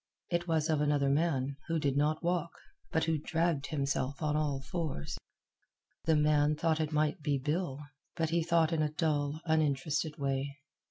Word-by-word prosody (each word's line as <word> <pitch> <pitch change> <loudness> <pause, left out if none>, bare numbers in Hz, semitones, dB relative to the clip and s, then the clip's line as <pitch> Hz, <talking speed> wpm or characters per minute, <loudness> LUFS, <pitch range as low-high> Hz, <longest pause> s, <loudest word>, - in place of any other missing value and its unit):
It 170 0 0
was 160 -2 +1
of 155 -2 +1
another 145 -2 +2
man, 140 -3 +1
who 165 -1 0
did 140 -3 0
not 150 +3 +1
walk, 170 0 0 0.4
but 160 - +1
who 160 -1 +1
dragged 165 -2 0
himself 140 -2 -1
on 150 -2 0
all 150 -3 0
fours. 155 - -3 0.9
The 160 - +4
man 150 0 +3
thought 160 +1 +1
it 155 -1 -1
might 155 +3 +1
be 145 -1 +1
Bill, 150 0 -2 0.3
but 165 -2 0
he 170 0 +2
thought 165 0 +2
in 160 - +1
a 150 - +2
dull, 150 -1 -1
uninterested 155 0 +1
way. 140 0 -2
150 Hz, 170 wpm, -32 LUFS, 145-165 Hz, 0.9 s, The